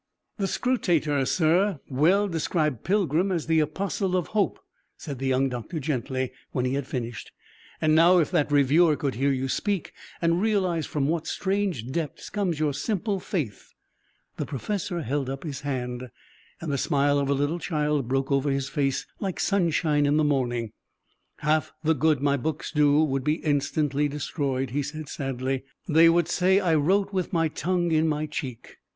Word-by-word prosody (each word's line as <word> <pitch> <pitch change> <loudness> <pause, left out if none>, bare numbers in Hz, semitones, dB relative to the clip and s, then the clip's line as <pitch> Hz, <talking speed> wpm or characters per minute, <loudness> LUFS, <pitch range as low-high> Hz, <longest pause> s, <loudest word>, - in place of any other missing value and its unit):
"The 195 - +1
Scrutator, 160 - +1
sir, 175 +1 +2
well 170 +10 +3
described 155 - -1
'Pilgrim' 185 -1 +1
as 170 -4 -1
the 160 0 +3
Apostle 185 +4 -1
of 180 - -2
Hope," 210 -2 +1 0.4
said 140 -5 -7
the 135 - -2
young 130 +1 +2
doctor 125 +5 -5
gently, 130 -3 -2 0.2
when 125 - 0
he 130 - 0
had 140 -1 -2
finished; 120 -4 -5 0.5
"and 155 0 +2
now, 170 +3 +6
if 165 -2 +2
that 150 -5 +1
reviewer 150 +3 +4
could 140 -2 -2
hear 140 +4 +1
you 135 0 -1
speak 200 +6 -2 0.3
and 170 +1 +2
realize 185 -7 +1
from 140 -2 -1
what 160 +1 -1
strange 190 - -1
depths 155 -1 -4
comes 185 -7 -1
your 150 -2 +1
simple 205 - -1
faith 155 - -4 0.3
" - - -42
The - - -2
professor 175 - -3
held 135 +1 -2
up 135 0 -5
his 145 -5 -5
hand, 125 -3 -4 0.5
and 165 -3 -4
the 140 - 0
smile 145 +1 +2
of 140 -1 -1
a 140 - +3
little 145 +5 0
child 150 -6 -1
broke 135 +2 -1
over 140 +1 +2
his 135 0 -1
face 140 -3 -1
like 190 -3 -3
sunshine 160 -6 +2
in 145 +1 +3
the 155 - +3
morning. 120 -6 0 0.7
"Half 155 0 +1
the 160 +1 +3
good 150 -1 +1
my 140 0 +3
books 155 +3 -3
do 150 -1 +4
would 135 -3 -1
be 150 +2 +2
instantly 145 -1 0
destroyed," 140 -3 -2
he 145 +3 0
said 155 +2 -6
sadly; 135 -1 -3 0.2
"they 165 +2 +6
would 170 -1 +3
say 185 +2 +3
that 200 - 0
I 165 - +3
wrote 190 +7 +2
with 185 -2 -1
my 165 -3 +2
tongue 175 +2 -1
in 160 0 +3
my 150 0 0
cheek. 135 -5 -6
150 Hz, 180 wpm, -26 LUFS, 135-170 Hz, 0.7 s, now